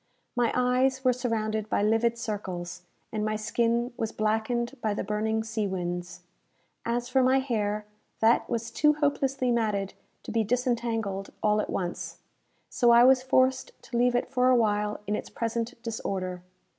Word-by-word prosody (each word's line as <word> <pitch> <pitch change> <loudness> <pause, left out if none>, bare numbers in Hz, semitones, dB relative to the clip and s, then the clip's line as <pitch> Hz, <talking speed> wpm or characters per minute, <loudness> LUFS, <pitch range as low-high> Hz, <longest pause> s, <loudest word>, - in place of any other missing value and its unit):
My 240 -2 +2
eyes 255 +1 +2
were 255 -1 +4
surrounded 220 -3 -2
by - - +1
livid 225 +2 +2
circles, 180 -6 -5 0.3
and 215 -1 -2
my 215 0 0
skin 235 +3 0
was 225 -1 -2
blackened 225 +4 -1
by 215 -2 0
the - - -2
burning 220 +2 -1
sea 220 -2 -2
winds. 175 -1 -4 0.7
As 240 +1 -1
for 260 +1 +2
my 260 +1 +4
hair, 215 -5 -1 0.3
that 225 +1 +3
was 230 -1 -2
too 300 +5 +4
hopelessly 275 -3 0
matted 210 -4 0 0.3
to - - -6
be 225 0 +2
disentangled 225 -4 -1
all 210 0 +3
at - - -5
once; 175 -2 -4 0.5
so 240 -2 +2
I 235 0 +8
was 255 0 +6
forced 260 0 +1
to 240 - -8
leave 245 0 +3
it 245 - +1
for 255 0 +2
awhile 210 -4 +2
in 210 +1 -1
its - - -5
present 230 +1 -3
disorder. 190 -5 -3
230 Hz, 160 wpm, -27 LUFS, 210-250 Hz, 0.7 s, I